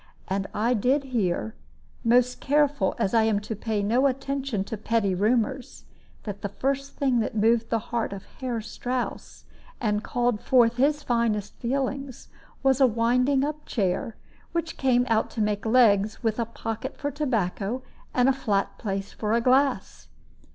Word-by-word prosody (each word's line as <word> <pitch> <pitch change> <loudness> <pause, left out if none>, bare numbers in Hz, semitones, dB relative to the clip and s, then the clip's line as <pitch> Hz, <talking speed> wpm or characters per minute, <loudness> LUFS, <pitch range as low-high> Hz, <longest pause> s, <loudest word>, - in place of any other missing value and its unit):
And 195 +1 -1
I 230 +4 +1
did 255 +6 +2
hear 220 -5 -1 0.5
most 245 +1 +3
careful 285 -7 +2
as 190 - 0
I 225 - +5
am 220 -2 +2
to 220 +1 -5
pay 215 0 -2
no 240 +7 +3
attention 270 -5 -2
to 210 - -5
petty 215 -2 0
rumors 240 +6 0 0.4
that 205 -2 -6
the 200 - -3
first 275 +6 -2
thing 265 -4 +1
that 220 - -2
moved 230 +2 +3
the 230 - +2 0.2
heart 230 -3 0
of 200 -1 -7
Herr 245 -4 -2
Strouss, 245 +3 -5 0.3
and 210 -2 0
called 245 -3 0
forth 240 -2 +4
his 290 +3 +2
finest 225 -4 0
feelings, 270 +1 -3 0.3
was 270 0 +3
a 265 - +8
winding 250 +4 +2
up 300 +1 -3
chair, 200 +1 -1 0.4
which 335 -1 -2
came 250 -2 +2
out 225 -2 +1
to - - -7
make 210 +1 -1
legs, 220 -3 +3
with 225 0 0
a 235 - +1
pocket 225 +2 -5
for 285 - -3
tobacco, 235 - -1 0.3
and 250 0 +3
a 270 - +5
flat 205 -7 -1
place 195 -2 -4
for 215 0 -2
a 230 - +4
glass. 265 +3 +1
235 Hz, 165 wpm, -26 LUFS, 210-265 Hz, 0.5 s, a